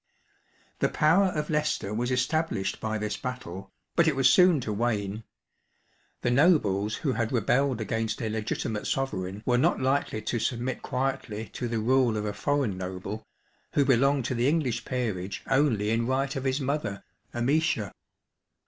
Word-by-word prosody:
The - - +2
power 180 +6 +4
of 155 -4 -2
Leicester 150 -9 0
was 120 +3 -1
established 125 -6 0
by 110 0 -1
this 105 -1 -3
battle, 95 -7 -6 0.2
but 170 -1 +4
it 155 - +2
was 135 -1 +4
soon 180 +1 +6
to 110 -3 -3
wane. 105 -1 -1 1.0
The 120 - +2
nobles 110 - +3
who 140 - -1
had 115 -2 -1
rebelled 125 +2 +1
against 110 +1 -2
a 115 - -2
legitimate 110 0 -3
sovereign 100 -6 -2
were 125 -1 +3
not - - +2
likely 130 -4 0
to 120 - -1
submit 120 +2 -2
quietly 125 -4 -3
to 125 - -4
the 115 -1 -2
rule 120 0 +2
of 105 - -2
a 105 - -2
foreign 125 -4 0
noble, 95 +3 -5 0.5
who 140 - +3
belonged 135 0 +3
to 130 - -1
the 120 +1 +1
English 135 -7 0
peerage 100 -7 -3
only 120 -7 +2
in 115 +1 +1
right 135 +2 0
of 135 0 -3
his 130 +2 +1
mother, 130 -8 -2 0.3
Amicia. 120 - +1
120 Hz, 160 wpm, -27 LUFS, 105-135 Hz, 1.0 s, soon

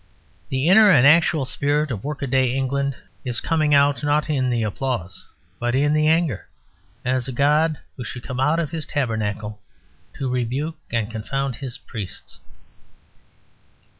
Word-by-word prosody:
The 130 +3 0
inner 210 +3 +7
and 135 -9 +6
actual 155 -1 +5
spirit 145 +2 0
of 105 -5 -4
workaday 135 -3 0
England 140 +1 -1 0.3
is 125 -3 -2
coming 155 -3 +2
out 140 -2 +3
not 150 +1 +1
in 130 -3 +1
applause, 105 -4 -3 0.3
but 120 +1 0
in 145 +3 +2
anger, 155 - +1 0.6
as 130 -1 0
a - - -3
god 150 +4 +2 0.2
who 125 - -6
should 120 +1 -7
come 125 -1 -5
out 150 +5 +2
of 160 -3 -2
his 160 -3 -4
tabernacle 110 -5 -2 0.5
to 135 - -4
rebuke 130 +6 -2
and 115 -2 -1
confound 130 +3 -3
his 130 -3 -6
priests. 105 -6 -8
135 Hz, 140 wpm, -22 LUFS, 120-150 Hz, 0.6 s, inner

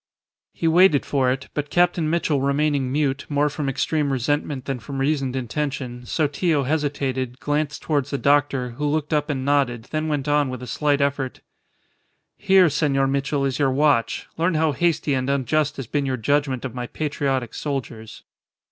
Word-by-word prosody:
He 165 - -2
waited 165 -3 +5
for 130 -3 +1
it, 135 +2 -4
but 150 -1 -3
Captain 175 -2 +2
Mitchell 160 -4 +1
remaining 140 -1 +1
mute, 140 -1 -1
more 145 0 +2
from 145 -1 -3
extreme 145 +2 0
resentment 135 +1 -1
than 135 -2 -3
from 135 +4 -7
reasoned 135 -2 0
intention, 130 -1 -4
Sotillo 150 0 +1
hesitated, 135 -3 -2
glanced 150 0 -2
towards 145 -3 0
the 140 - -2
doctor, 140 -3 +2
who 145 +5 -3
looked 150 +1 -1
up 150 0 +1
and 130 -3 -2
nodded, 130 -5 0
then 155 0 -1
went 145 -3 -2
on 145 -2 +2
with 130 -1 -6
a - - -5
slight 145 +3 0
effort 140 -2 -1 0.9
"Here, 190 -3 +5
Senor 140 -3 +1
Mitchell, 140 +1 0
is 135 0 -2
your 140 -2 +3
watch. 135 -3 +1
Learn 165 +1 +2
how 155 0 +2
hasty 155 0 0
and 130 0 -1
unjust 145 +2 +1
has 135 - -4
been 140 +4 -1
your 130 -1 -1
judgment 135 +1 0
of 130 - -5
my 125 -1 -4
patriotic 135 -5 -2
soldiers." 120 -6 -5
140 Hz, 175 wpm, -23 LUFS, 130-150 Hz, 0.9 s, waited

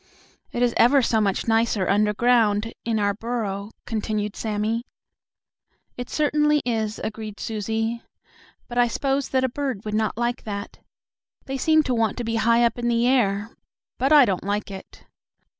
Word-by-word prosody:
"It 240 - -1
is 240 -1 +2
ever 265 +3 +5
so 225 -1 +2
much 200 0 0
nicer 225 -3 +2
underground 210 +1 +2
in 230 -1 -1
our 205 -1 +1
burrow," 210 -2 -4 0.2
continued 215 -2 -2
Sammie. 220 +2 -2 1.1
"It 245 0 -6
certainly 300 0 +2
is," 220 -3 -1
agreed 215 -1 -6
Susie, 225 +2 -2 0.7
"but 240 0 -2
I 240 - +5
s'pose 270 +3 -1
that 260 -1 +1
a - - +3
bird 260 -6 -4
would 210 - -4
not 220 0 0
like 240 +1 -1
that. 200 -1 -6 0.7
They 270 0 -4
seem 315 +2 +4
to 255 - -1
want 225 -3 0
to 245 - -3
be 230 0 -1
high 230 +2 +4
up 235 - -1
in 240 - -1
the 235 0 +2
air. 225 -4 +1 0.5
But 270 +3 +1
I 295 -4 +8
don't 190 -5 -1
like 205 0 -2
it. 190 -1 -11
230 Hz, 165 wpm, -23 LUFS, 210-245 Hz, 1.1 s, I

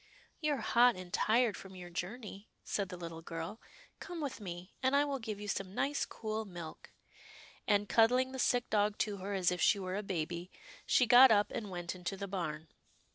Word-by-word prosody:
" - - -34
You're 295 -5 0
hot 240 +2 +5
and 185 -1 -9
tired 225 -1 +3
from 190 -1 -10
your 175 -1 -9
journey," 200 +3 -6
said 200 -2 -2
the 180 - -7
little 165 -1 -7
girl, 165 +6 -6 0.2
" - - -25
come 350 -2 -7
with 280 -7 -4
me, 180 -1 -7
and 260 +1 +2
I 285 +1 +4
will 280 -2 -2
give 220 -3 -5
you 210 - -6
some 195 -1 -3
nice, 285 +1 0
cool 220 0 -4
milk," 175 -6 -9 0.8
and, 205 -1 +3
cuddling 250 +4 +4
the 265 - -6
sick 245 -1 +2
dog 210 0 +2
to 205 -2 -1
her 195 +2 -4
as 185 -2 +2
if 180 -2 -2
she 205 - +5
were 185 -1 -4
a 205 - -1
baby, 175 -2 -3 0.4
she 250 - +5
got 245 +3 +9
up 210 -2 +3
and 220 -4 -4
went 175 -2 -4
into 185 +1 -5
the 200 +1 -4
barn. 160 -5 -4
205 Hz, 210 wpm, -33 LUFS, 180-240 Hz, 0.8 s, got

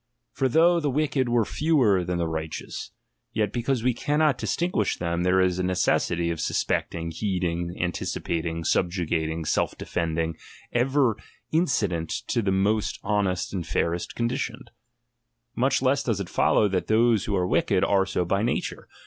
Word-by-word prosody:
For 135 -1 0
though 170 +6 +4
the 150 -3 0
wicked 140 -2 0
were 120 -2 +2
fewer 130 - +2
than 90 0 -2
the 85 -1 0
righteous, 80 -1 -5 0.4
yet 105 -2 0
because 120 0 -1
we 125 0 +2
cannot 145 +2 +1
distinguish 170 - 0
them, 85 0 -1
there 90 +1 +3
is 90 -1 +2
a - - 0
necessity 85 -2 +1
of 85 - -4
sus - - 0
pecting, 85 -1 -2
heeding, 85 -2 -2
anticipating, 85 -1 -2
subjugating, 80 -3 0
self - - 0
defending, 80 -1 -2 0.4
ever 125 -1 +2 0.3
incident 105 - +1 0.2
to 115 - +1
the 100 -3 0
most 100 +3 +1
honest 100 -4 0
and 90 -4 -3
fairest 85 +2 -1
conditioned. 120 +2 -3 0.8
Much 135 +1 +1
less 135 +2 +3
does 115 -6 -1
it 100 - -4
follow, 105 - +3
that 95 -2 -1
those 110 -1 +3
who 105 - -1
are 90 -2 +1
wicked, 95 +1 +2
are 95 -1 +2
so 95 -2 -1
by 95 +3 +1
nature. 120 +3 -2
95 Hz, 155 wpm, -25 LUFS, 85-120 Hz, 0.8 s, though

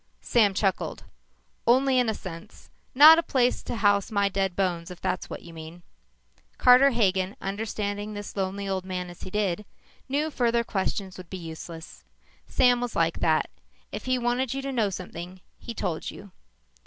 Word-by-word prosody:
Sam 210 -5 +3
chuckled. 195 -2 -1 0.6
"Only 260 +2 +4
in 245 -2 +2
a 220 - -1
sense. 185 +3 -10 0.2
Not 310 +4 +10
a - - +3
place 250 -6 +1
to - - -5
house 205 -3 +2
my 200 -2 +1
dead 195 -2 -1
bones 175 -3 -1
if 180 -1 -9
that's 185 - -2
what - - -7
you 170 - -12
mean." 165 +2 -10 0.7
Carter 255 +2 +7
Hagen, 195 -5 +1
understanding 205 +1 -3
this 205 0 -7
lonely 195 0 -2
old 190 -1 -2
man 180 -1 -4
as 175 - -15
he - - -7
did, 205 -1 -1 0.5
knew 295 +3 0
further 235 -3 +1
questions 190 -3 -3
would 180 -2 -11
be 190 - -5
useless. 165 -1 -9 0.4
Sam 245 -1 +3
was 245 -2 -4
like 165 0 +1
that. 160 -2 +1 0.4
If - - -6
he 255 0 +1
wanted 245 +1 0
you 275 - -3
to 275 - -3
know 225 -6 +1
something, 180 -1 -7 0.2
he 235 - -8
told 175 -7 -3
you. 200 -1 -11
200 Hz, 175 wpm, -26 LUFS, 185-240 Hz, 0.7 s, Not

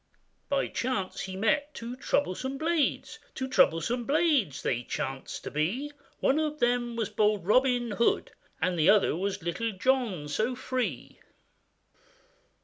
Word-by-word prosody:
By 280 -1 +1
chance 220 -7 -2
he 190 -1 -5
met 275 +9 +1
two 235 +2 -6
troublesome 260 0 -1
blades, 320 -1 0 0.2
Two 260 - -3
troublesome 240 - +2
blades 285 - +2
they 120 -1 0
chanced 130 +2 -5
to - - -6
be; 195 - -1
The - - -18 0.3
one 275 +4 +3
of 305 -1 -1
them 240 -1 +1
was 220 -3 -2
bold 210 -3 +1
Robin 245 +2 +3
Hood, 230 +3 +1 0.3
And 180 -1 0
the 155 - +5
other 205 -6 +4
was 190 0 -3
Little 220 +7 -2
John, 215 - 0
so 220 +11 -1
free. 255 0 -3
235 Hz, 140 wpm, -28 LUFS, 190-265 Hz, 0.3 s, the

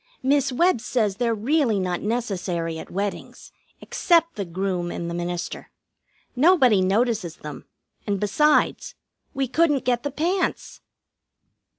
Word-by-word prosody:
Miss 275 0 +2
Webb 335 0 +2
says 215 -7 0
they're 235 -1 +1
really 235 -1 +1
not 180 -2 -2
necessary 185 -7 -2
at - - -9
weddings, 200 +2 -5 0.3
except 335 -1 +2
the 200 - -3
groom 180 0 -2
and 170 - -5
the 170 - -4
minister. 175 0 -4 0.7
Nobody 260 - +5
notices 200 -3 0
them, 150 -1 -9 0.4
and, 200 -1 0
besides, 295 +10 +2 0.4
we 270 -1 0
couldn't 295 0 +1
get 245 -1 +1
the 285 - -3
pants. 345 +7 -2
220 Hz, 125 wpm, -23 LUFS, 185-280 Hz, 0.7 s, Nobody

